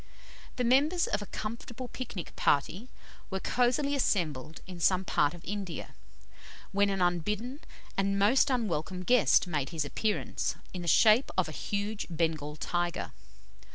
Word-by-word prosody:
The 250 - -1
members 285 +8 +3
of 210 - -1
a 205 - -7
comfortable 235 +3 -6
pic 255 -2 -7
nic 175 - -6
party 180 - +1 0.4
were 190 -1 -2
cosily 250 +7 +1
assembled 160 - -1
in 180 -1 -9
some 185 +2 +3
part 145 -1 +2
of 175 - -13
India, 195 -4 -5 0.8
when 200 +1 +3
an 195 -2 +1
unbidden 210 - -1 0.4
and 195 0 +1
most 225 +8 +4
unwelcome 185 - -1
guest 245 +1 +4
made 150 -6 -2
his 160 -4 -2
appearance, 210 +8 -1 0.2
in 180 - -4
the 170 - -6
shape 220 - +5
of 185 -3 +2
a - - -6
huge 205 +6 -3
Bengal 160 -3 -1
tiger. 175 +2 -2
195 Hz, 150 wpm, -30 LUFS, 170-235 Hz, 0.8 s, shape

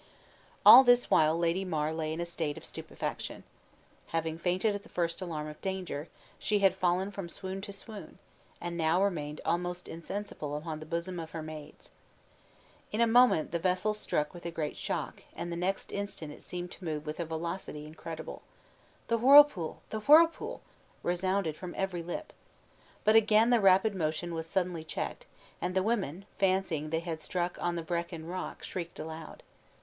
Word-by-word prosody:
All 265 - +12
this 245 -1 +4
while 155 +1 +5
Lady 170 +2 +1
Mar 155 -4 -1
lay 160 -1 -2
in 160 - -3
a 170 - -1
state 165 -3 -3
of - - -9
stupefaction. - - -5 0.6
Having 165 0 -2
fainted 185 +5 +1
at 205 - -4
the 230 - -17
first 170 +1 -1
alarm 160 -4 -3
of 150 0 -10
danger, 185 -5 -3 0.3
she 210 - +1
had 195 -2 +4
fallen 185 +1 +1
from 195 -4 -6
swoon 190 +2 -5
to 200 - -7
swoon, 205 +1 -10 0.4
and 175 0 -4
now 170 +3 +2
remained 150 -6 -2
almost 180 +1 -1
insensible 165 -4 -5
upon 155 0 -5
the 155 - -9
bosoms 170 +2 -3
of 160 - -7
her 160 -2 -4
maids. 155 -1 -10 1.0
In 215 - -2
a 235 - +6
moment 240 -7 +5
the 170 - 0
vessel 185 +4 +1
struck 150 -7 -1
with 175 - -10
a 170 - -3
great 160 -2 -3
shock, - - -4
and 175 - -4
the - - -2
next 185 +3 -2
instant 200 -6 -4
it - - -14
seemed 180 0 -6
to - - -12
move 155 -2 -3
with 150 +2 -5
a - - +1
velocity 160 -1 -4
incredible. 160 +1 -7 0.7
"The 230 0 +1
whirpool! 270 - +6
the 220 - -2
whirlpool!" 315 +8 +5 0.4
resounded 180 -2 0
from 180 +2 -7
every 190 -3 -1
lip. 175 - -6 0.7
But 215 +1 +5
again 225 +1 +5
the 240 -2 +5
rapid 195 +2 +5
motion 170 -1 -2
was 165 0 -4
suddenly 180 -2 -1
checked, 160 - -5 0.3
and 180 +1 -2
the 190 - +3
women, 195 -5 -1
fancying 185 -6 +1
they 160 +1 0
had 165 -2 -4
struck 175 +2 -3
on 175 0 0
the 170 - -3
Vrekin 170 -1 -3
Rock, 180 +1 -5
shrieked 170 -2 -5
aloud. 160 0 -8
175 Hz, 175 wpm, -31 LUFS, 160-195 Hz, 1.0 s, All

